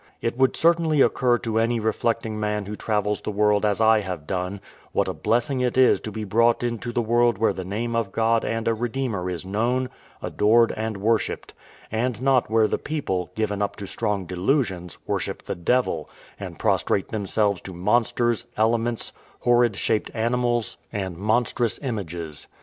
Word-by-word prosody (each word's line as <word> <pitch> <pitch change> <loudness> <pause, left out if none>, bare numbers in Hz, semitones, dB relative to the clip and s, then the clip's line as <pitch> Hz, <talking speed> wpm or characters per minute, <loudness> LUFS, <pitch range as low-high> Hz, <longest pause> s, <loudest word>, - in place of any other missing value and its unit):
It 115 - -2
would 130 +1 +3
certainly 165 -2 +3
occur 125 -3 +3
to 115 -2 -1
any 115 +1 +1
reflecting 110 0 -1
man 105 -1 -1
who 105 +2 -5
travels 105 -1 -1
the - - -4
world 105 0 +2
as 105 -1 +1
I 110 0 +5
have 90 -7 -5
done, 90 +4 -3 0.3
what - - +1
a - - -2
blessing 120 +3 0
it 125 0 0
is 130 -1 +5
to 110 - -5
be 110 +1 -5
brought 115 +4 +2
into 120 0 -2
the 120 0 0
world 120 -1 +3
where 110 - +2
the 95 - -5
name 115 +5 -3
of 115 -4 -1
God 115 +1 +2
and 115 0 -2
a 115 - +3
Redeemer 115 -5 -2
is 90 0 -5
known, 120 +6 0 0.3
adored, 115 +2 +3
and 110 -1 -3
worshipped; 110 +3 -1 0.4
and 115 +1 -1
not 130 -1 +2
where 110 -1 +4
the - - -1
people, 95 - -2
given 105 -2 -1
up 100 - -1
to 100 - -7
strong 105 -2 -2
delusions, 90 - -1
worship - - -3
the - - -3
devil, 125 +9 0 0.3
and - - -7
prostrate 95 - +1
themselves 100 -2 0
to 95 - -8
monsters, 120 +4 +1
elements, 115 +1 0 0.3
horrid 120 -3 +3
shaped 105 +2 0
animals, 120 0 0
and 95 -3 -3
monstrous 110 +4 0
images. 85 - -4
110 Hz, 170 wpm, -24 LUFS, 100-120 Hz, 0.4 s, I